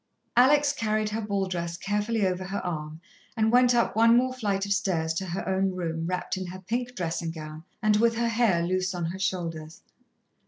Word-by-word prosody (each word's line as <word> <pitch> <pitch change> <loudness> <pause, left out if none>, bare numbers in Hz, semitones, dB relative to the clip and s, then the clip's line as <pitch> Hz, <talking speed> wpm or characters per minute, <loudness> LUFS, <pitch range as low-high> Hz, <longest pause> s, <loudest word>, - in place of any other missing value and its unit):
Alex 285 +4 +5
carried 215 -4 0
her 220 +2 -3
ball 200 -2 -1
dress 170 -2 -3
carefully 210 +3 0
over 185 0 -1
her 195 +2 -4
arm 155 -2 -4 0.4
and 220 0 +3
went 245 0 +5
up 235 -3 +1
one 230 +1 +6
more 255 +1 +2
flight 200 -6 -1
of 200 - +1
stairs 170 -6 0
to 190 +3 -3
her 175 +2 -4
own 190 0 +1
room, 165 -2 -3
wrapped 180 +1 -2
in 185 -1 -4
her 180 +1 -7
pink 240 +6 -3
dressing 165 -2 -2
gown, 155 -1 -8 0.2
and 210 -1 +4
with 230 +1 +3
her 235 0 0
hair 225 -7 +2
loose 185 +1 -1
on 175 -1 -2
her 180 +3 -4
shoulders. 165 -4 -3
195 Hz, 200 wpm, -27 LUFS, 170-225 Hz, 0.4 s, one